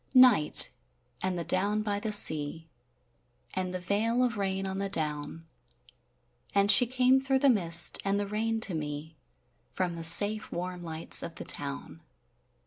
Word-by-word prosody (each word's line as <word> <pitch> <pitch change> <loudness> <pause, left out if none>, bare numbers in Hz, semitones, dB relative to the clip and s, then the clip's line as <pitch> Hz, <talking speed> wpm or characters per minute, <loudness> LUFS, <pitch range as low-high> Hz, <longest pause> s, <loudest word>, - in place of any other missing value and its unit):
NIGHT, 250 -12 +7 0.5
and 185 -1 -4
the 170 - -5
down 205 +5 -1
by 205 -1 -4
the 215 +1 -5
sea, 160 -5 0 0.9
And 185 -1 -5
the 185 - -6
veil 220 +7 -2
of 240 -2 -3
rain 195 -1 -4
on 190 0 -6
the 195 0 -5
down; 150 -1 -5 1.1
And 200 +1 +3
she 245 - +6
came 255 +1 0
through 270 0 -1
the 275 0 +2
mist 170 -6 +4
and 200 0 -2
the 205 - -4
rain 225 +2 -4
to 200 - +1
me 150 0 -8 0.6
From 180 -2 -4
the 165 0 -9
safe 205 +6 +2
warm 180 +1 -7
lights 160 -1 0
of - - -9
the - - -10
town. 70 -1 -5
195 Hz, 160 wpm, -26 LUFS, 165-215 Hz, 1.1 s, NIGHT